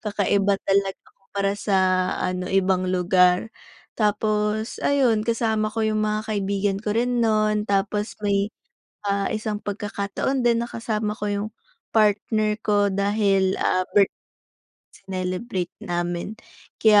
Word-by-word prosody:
kakaiba 200 -1 +1
talaga 195 0 +1 0.2
kumpara 195 0 -3
sa 200 -3 +1 0.4
ano 180 0 -2
ibang 190 -1 +2
lugar. 180 +3 +3 0.5
Tapos 210 +1 0
ayun 255 -6 +3
kasama 220 -2 0
ko 220 0 -1
yung 215 0 0
mga 215 0 -1
kaibigan 200 -1 0
ko 210 0 -2
rin 245 0 +1
no'n, 215 -1 +2
tapos 205 +2 0
may, 200 0 +2 0.6
ah, 200 0 0
isang 215 -1 -3
pagkakataon 205 +5 -2
din 235 0 +2
na 235 - -5
kasama 215 -2 -2
ko 210 - -4
yung 205 +1 -2 0.4
partner 215 0 +2
ko 205 -1 +3
dahil 200 -1 +2
ah 185 0 +2
birth 200 -1 +4 0.8
sinelebrate 185 0 -4
namin 175 +4 -3 0.4
kaya 215 -2 +7
205 Hz, 125 wpm, -23 LUFS, 195-215 Hz, 0.8 s, kaya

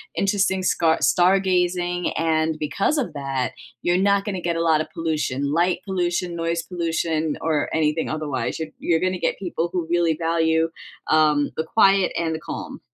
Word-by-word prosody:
interesting 190 -1 +1
scar 165 -3 +2
stargazing, 180 -1 +2
and 160 -1 +1
because 180 - 0
of 265 - -2
that, 135 -3 -2 0.3
you're 175 +1 +2
not 200 +1 +2
gonna 190 -4 -3
get 170 -1 -1
a 165 - 0
lot 160 -2 +3
of - - -6
pollution, 150 -4 -2
light 175 +2 +2
pollution, 175 -2 -1
noise 165 0 -1
pollution, 165 -3 -1
or 155 -2 0
anything 160 0 0
otherwise. 150 -6 -3
You're 160 -1 -4
you're 165 -2 +1
gonna 185 -1 -1
get - - -1
people 175 -2 -2
who 175 -3 -2
really 170 -2 +2
value, 165 0 +1 0.4
um, 150 -2 +3
the 160 - 0
quiet 195 +1 +3
and 160 -1 -1
the - - -5
calm. - - -7
165 Hz, 165 wpm, -23 LUFS, 155-180 Hz, 0.4 s, lot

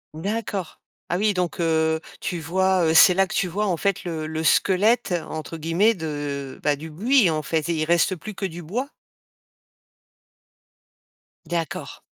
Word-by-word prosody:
D'accord. 195 0 -4 0.3
Ah 175 - 0
oui, 210 +2 +2
donc, 180 -2 -2
heu, 160 -1 +2 0.2
tu 175 - -3
vois, 185 +2 +1
heu, 160 - +2
c'est 180 +3 +8
là 195 +1 +2
que - - -7
tu 180 - +1
vois, 205 +5 -1
en 180 - +1
fait, 195 +3 -1
«le 160 -3 -3
le 160 0 -3
squelette», 205 +5 +3 0.2
entre 160 +1 -6
guillemets, 165 +8 +2
de, 145 -6 -5
bah, 150 -1 +2
du 160 +3 -8
buis, 215 - +3
en 155 -1 -1
fait, 160 -1 -1
et - - +2
il 155 - 0
reste 170 +3 +2
plus 215 +5 -8
que 195 - -4
du 175 -2 -6
bois? 240 - -3 2.6
D'accord. 165 -1 -4
170 Hz, 170 wpm, -23 LUFS, 160-195 Hz, 2.6 s, c'est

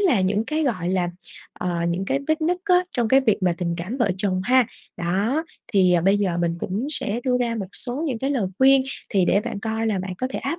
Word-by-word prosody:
là 330 - +3
những 200 +3 +1
cái, 310 +5 -1
gọi 185 -10 -1
là, 180 -1 0 0.4
ờ, 180 - -4 0.2
những 175 +3 -1
cái 270 - 0
vết 315 0 +1
nứt 340 +3 +1
á 365 -2 +4
trong 240 -5 0
cái 265 +4 +5
việc 225 -6 +2
mà 180 -1 +3
tình 170 -2 -1
cảm 185 +9 -4
vợ 240 -4 +1
chồng 190 -2 -1
ha. 255 +1 +4 0.3
Đó, 200 - 0 0.3
thì 185 -3 +4
bây 195 +2 +4
giờ 190 -4 0
mình 170 -1 0
cũng 200 +9 -3
sẽ 235 -6 -1
đưa 255 -2 +2
ra 235 -1 0
một 205 -4 -4
số 250 +4 -1
những 255 -6 -2
cái 270 +4 -1
lời 250 -9 0
khuyên 270 0 +6 0.3
thì 195 -3 +3
để 195 +3 +3
bạn 205 - -5
coi 220 +1 -2
là 210 -3 0
bạn 185 0 -4
có 255 - -1
thể - - -3
áp 295 +6 -3
220 Hz, 250 wpm, -23 LUFS, 185-265 Hz, 0.4 s, khuyên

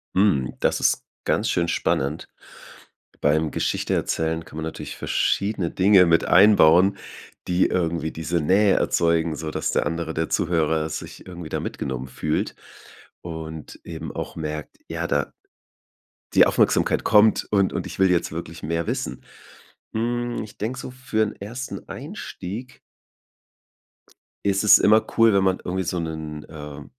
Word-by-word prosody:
Hm, 90 -10 +2
das - - +1
ist - - +2 0.2
ganz - - +1
schön 85 -1 +1
spannend. 75 -2 -1 0.9
Beim 75 +1 +2
Geschichte - - -1
erzählen 80 0 -1
kann 80 - -13
man 80 - -3
natürlich 80 - -6
verschiedene 100 -4 0
Dinge 95 -1 +5
mit 85 -1 +3
einbauen, 95 -1 +6 0.5
die 90 +1 +3
irgendwie 85 -2 -1
diese 80 +2 -2
Nähe 95 +5 +4
erzeugen, 85 -1 +1
sodass 75 +1 -3
der - - +1
andere 80 -1 -3
der 80 0 -2
Zuhörer 80 -2 +1
sich 80 - -8
irgendwie 85 -3 -8
da - - -2
mitgenommen 65 -1 -4
fühlt 75 +4 -2 0.7
und 80 -2 -7
eben - - -6
auch - - -5
merkt, 75 -1 -5
ja, - - -3
da - - 0 1.0
die - - +7
Aufmerksamkeit - - +2
kommt 110 0 +4
und 100 -2 +3
und - - -3
ich - - -8
will 95 -1 +5
jetzt 85 -3 +1
wirklich 80 0 -7
mehr 85 +1 -2
wissen. 60 +1 -3 0.7
Hm, 120 +2 -1
ich 105 - -12
denke 120 +4 -3
so, 125 - -7
für 125 -4 -2
'n 105 - -3
1. 120 +6 -7
Einstieg 125 - -7 1.7
ist 100 +1 +2
es 105 - +8
immer 110 +1 +5
cool, 115 -1 +6
wenn 100 -1 +3
man 95 -1 +2
irgendwie 95 +1 -2
so 90 +1 -2
'nen, 80 -2 -5
äh 75 -2 -9
85 Hz, 145 wpm, -23 LUFS, 80-100 Hz, 1.7 s, es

